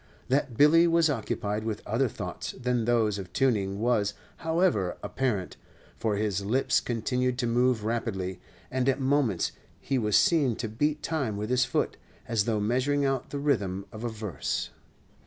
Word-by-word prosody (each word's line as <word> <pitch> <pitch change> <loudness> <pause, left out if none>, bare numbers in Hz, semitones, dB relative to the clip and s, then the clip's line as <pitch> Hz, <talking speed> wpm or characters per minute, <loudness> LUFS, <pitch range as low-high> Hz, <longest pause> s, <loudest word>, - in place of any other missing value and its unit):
That 130 -3 0
Billy 165 +4 +6
was 165 -2 +4
occupied 105 -3 -2
with 110 -2 -4
other 120 +5 +1
thoughts - - -5
than 125 -2 -1
those 110 -4 +2
of 95 -2 -8
tuning 100 -7 +1
was, 110 -3 +1 0.2
however, 160 - +1
apparent, 115 -9 -2 0.4
for 110 -2 -1
his 100 -2 -1
lips 125 +7 +2
continued 125 +2 -1
to 125 - 0
move 120 -1 +2
rapidly; 95 -6 -2 0.3
and 130 0 +1
at 135 +1 +1
moments 135 - +1 0.3
he 135 -2 -1
was 105 -3 +3
seen 145 -9 +3
to 115 - -3
beat 150 +8 -1
time 135 -11 -1
with 105 +3 -3
his 125 0 +3
foot, - - -1 0.3
as 110 -3 +1
though 110 -2 0
measuring 130 +7 +1
out 135 -2 -1
the 145 - -4
rhythm 100 -10 0
of 110 0 -8
a 120 - -1
verse. 105 -5 -3
120 Hz, 165 wpm, -28 LUFS, 105-135 Hz, 0.4 s, Billy